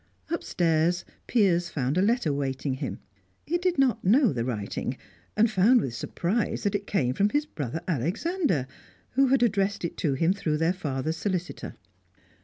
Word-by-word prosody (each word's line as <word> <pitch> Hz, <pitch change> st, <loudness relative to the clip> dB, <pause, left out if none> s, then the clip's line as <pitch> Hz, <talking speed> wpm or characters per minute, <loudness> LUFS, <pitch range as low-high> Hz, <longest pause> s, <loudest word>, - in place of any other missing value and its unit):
Upstairs, 175 Hz, -, +1 dB, 0.2 s
Piers 180 Hz, -7 st, +2 dB
found 140 Hz, -3 st, -1 dB
a 185 Hz, -, +3 dB
letter 215 Hz, -, +2 dB
awaiting 140 Hz, -1 st, -2 dB
him. 130 Hz, -, -4 dB, 0.5 s
He 345 Hz, +2 st, 0 dB
did 360 Hz, -2 st, 0 dB
not 255 Hz, -4 st, +2 dB
know 235 Hz, -, +4 dB
the 120 Hz, -3 st, -1 dB
writing, 110 Hz, -5 st, -3 dB, 0.4 s
and 220 Hz, +2 st, +5 dB
found 220 Hz, +4 st, +4 dB
with 130 Hz, -, -3 dB
surprise 185 Hz, -, -2 dB
that 205 Hz, -, +1 dB
it 200 Hz, 0 st, -2 dB
came 130 Hz, -11 st, +1 dB
from 200 Hz, +9 st, +2 dB
his 290 Hz, +5 st, 0 dB
brother 155 Hz, -, -5 dB
Alexander, 180 Hz, -, 0 dB, 0.5 s
who 270 Hz, +1 st, +3 dB
had 260 Hz, -1 st, +3 dB
addressed 200 Hz, -4 st, +1 dB
it 170 Hz, -, -5 dB
to 140 Hz, -4 st, 0 dB
him 165 Hz, +6 st, +2 dB
through 155 Hz, -6 st, -1 dB
their 165 Hz, +3 st, +2 dB
father's 155 Hz, -3 st, -3 dB
solicitor. 180 Hz, -1 st, -3 dB
180 Hz, 165 wpm, -27 LUFS, 150-230 Hz, 0.5 s, and